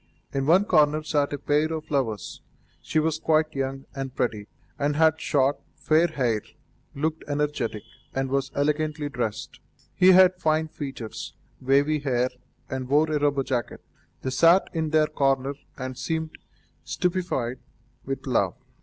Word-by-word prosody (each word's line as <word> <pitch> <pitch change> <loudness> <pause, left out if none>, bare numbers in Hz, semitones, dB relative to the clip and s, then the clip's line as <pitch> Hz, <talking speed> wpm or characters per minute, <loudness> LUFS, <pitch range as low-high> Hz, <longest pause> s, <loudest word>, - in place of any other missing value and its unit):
In 135 0 -1
one 185 +5 +5
corner 155 -4 +3
sat 145 -2 0
a 145 - -2
pair 150 +3 +1
of 160 -1 -5
lovers. 115 -8 -2 0.4
She - - -3
was 155 0 +1
quite 155 -1 +2
young 135 0 -3
and 135 -1 -5
pretty, 105 -4 -1 0.3
and 145 +1 +1
had 160 0 +3
short, 140 -1 +2 0.2
fair 160 +2 +3
hair, 125 -9 0 0.5
looked 155 +3 -2
energetic, 145 -7 -2 0.3
and 135 0 -2
was 135 0 0
elegantly 150 +1 0
dressed; 115 -5 -4 0.3
he 185 +7 +6
had 185 0 +7
fine 155 0 +1
features, 135 -7 -7 0.3
wavy 140 +4 +3
hair, 130 -3 0 0.4
and 130 -1 -5
wore 155 +3 +3
a 150 - +1
rubber 145 -1 +1
jacket. 125 -3 -3 0.4
They 130 - -2
sat 165 +8 +4
in 160 -2 -1
their 155 0 +4
corner 135 -2 0 0.2
and 130 -1 -5
seemed 160 +4 -3 0.5
stupefied 175 -10 -1 0.4
with 135 0 -5
love. 115 -6 +1
145 Hz, 145 wpm, -25 LUFS, 130-155 Hz, 0.5 s, had